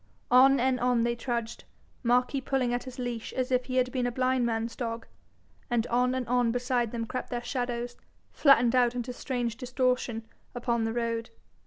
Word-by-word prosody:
On 265 Hz, +2 st, +7 dB
and 255 Hz, 0 st, +2 dB
on 245 Hz, -1 st, +2 dB
they 235 Hz, 0 st, +1 dB
trudged, 235 Hz, -1 st, -3 dB, 0.4 s
Marquis 250 Hz, +2 st, +2 dB
pulling 255 Hz, -2 st, 0 dB
at 245 Hz, -, -2 dB
his 255 Hz, -1 st, -9 dB
leash 245 Hz, -3 st, -4 dB
as 255 Hz, 0 st, -2 dB
if 250 Hz, 0 st, +2 dB
he 255 Hz, -, -4 dB
had 255 Hz, 0 st, +2 dB
been 250 Hz, -2 st, 0 dB
a -, -, -1 dB
blind 255 Hz, 0 st, +1 dB
man's 230 Hz, 0 st, -2 dB
dog, 230 Hz, -1 st, -4 dB, 0.6 s
and 240 Hz, -2 st, +1 dB
on 250 Hz, +2 st, +1 dB
and 255 Hz, -3 st, -2 dB
on 245 Hz, -1 st, +2 dB
beside 245 Hz, -1 st, 0 dB
them 230 Hz, -1 st, -3 dB
crept 255 Hz, +2 st, -5 dB
their 240 Hz, -1 st, -3 dB
shadows, 245 Hz, -1 st, -3 dB, 0.4 s
flattened 245 Hz, -5 st, +5 dB
out 250 Hz, -1 st, +3 dB
into 245 Hz, 0 st, -3 dB
strange 245 Hz, -3 st, -3 dB
distortion 250 Hz, -3 st, -1 dB, 0.3 s
upon 235 Hz, -1 st, 0 dB
the 225 Hz, -, -2 dB
road. 230 Hz, -1 st, -2 dB
245 Hz, 185 wpm, -28 LUFS, 235-255 Hz, 0.6 s, On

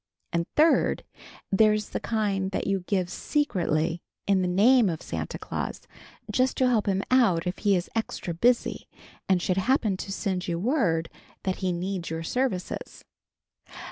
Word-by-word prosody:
And 170 Hz, 0 st, 0 dB
third, 315 Hz, +2 st, +3 dB, 0.5 s
there's 215 Hz, +1 st, +3 dB
the -, -, -3 dB
kind 200 Hz, -4 st, -1 dB
that 190 Hz, -, -2 dB
you 195 Hz, -1 st, +1 dB
give 185 Hz, -3 st, +1 dB
secretly, 175 Hz, -, 0 dB, 0.2 s
in 195 Hz, -2 st, +3 dB
the 180 Hz, -, +1 dB
name 215 Hz, +5 st, +5 dB
of 160 Hz, -2 st, -3 dB
Santa -, -, -4 dB
Claus, -, -, -4 dB, 0.5 s
just 260 Hz, 0 st, +1 dB
to 260 Hz, -, +3 dB
help 230 Hz, -5 st, +2 dB
him 195 Hz, 0 st, +1 dB
out 215 Hz, -10 st, +4 dB
if 180 Hz, +1 st, -3 dB
he 205 Hz, -2 st, +3 dB
is 175 Hz, 0 st, -1 dB
extra 220 Hz, -5 st, -2 dB
busy 235 Hz, +8 st, +1 dB, 0.4 s
and 190 Hz, -2 st, +4 dB
should 185 Hz, -, 0 dB
happen 215 Hz, -1 st, +2 dB
to 195 Hz, -, -6 dB
send 190 Hz, -2 st, -2 dB
you 170 Hz, -1 st, -1 dB
word 180 Hz, -, +1 dB, 0.4 s
that 190 Hz, -1 st, -1 dB
he 185 Hz, -2 st, -1 dB
needs 180 Hz, 0 st, -3 dB
your 165 Hz, 0 st, -4 dB
services. 235 Hz, -1 st, -3 dB
195 Hz, 160 wpm, -26 LUFS, 180-225 Hz, 0.5 s, name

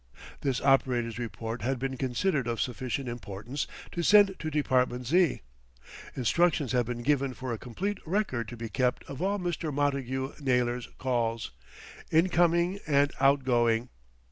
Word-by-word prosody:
This 135 Hz, -3 st, 0 dB
operator's 125 Hz, -4 st, +2 dB
report 115 Hz, 0 st, -5 dB
had 130 Hz, +4 st, 0 dB
been 135 Hz, +1 st, -3 dB
considered 130 Hz, +2 st, 0 dB
of 115 Hz, -1 st, -2 dB
sufficient 130 Hz, +2 st, -2 dB
importance 120 Hz, +3 st, -5 dB, 0.2 s
to 175 Hz, -, -2 dB
send 205 Hz, +2 st, +6 dB
to 155 Hz, -, -3 dB
Department 130 Hz, -4 st, +1 dB
Z. 170 Hz, +3 st, +3 dB, 0.7 s
Instructions 150 Hz, +2 st, +2 dB
had 125 Hz, -3 st, +1 dB
been 120 Hz, -1 st, -4 dB
given 135 Hz, -1 st, +1 dB
for 130 Hz, -2 st, -4 dB
a 110 Hz, -, -5 dB
complete 190 Hz, -, -3 dB
record 160 Hz, -, -1 dB
to 120 Hz, -, -8 dB
be 115 Hz, 0 st, -5 dB
kept 125 Hz, +2 st, 0 dB
of 140 Hz, +1 st, -8 dB
all 200 Hz, +2 st, +1 dB
Mr. 175 Hz, -4 st, -2 dB
Montagu 135 Hz, -2 st, -1 dB
Naylor's 125 Hz, -3 st, 0 dB
calls, 115 Hz, -, -1 dB, 0.6 s
in 165 Hz, +4 st, +4 dB
coming 175 Hz, +2 st, +2 dB
and 145 Hz, -1 st, +3 dB
out 135 Hz, 0 st, +4 dB
going. 120 Hz, -1 st, +2 dB
130 Hz, 150 wpm, -29 LUFS, 120-150 Hz, 0.7 s, send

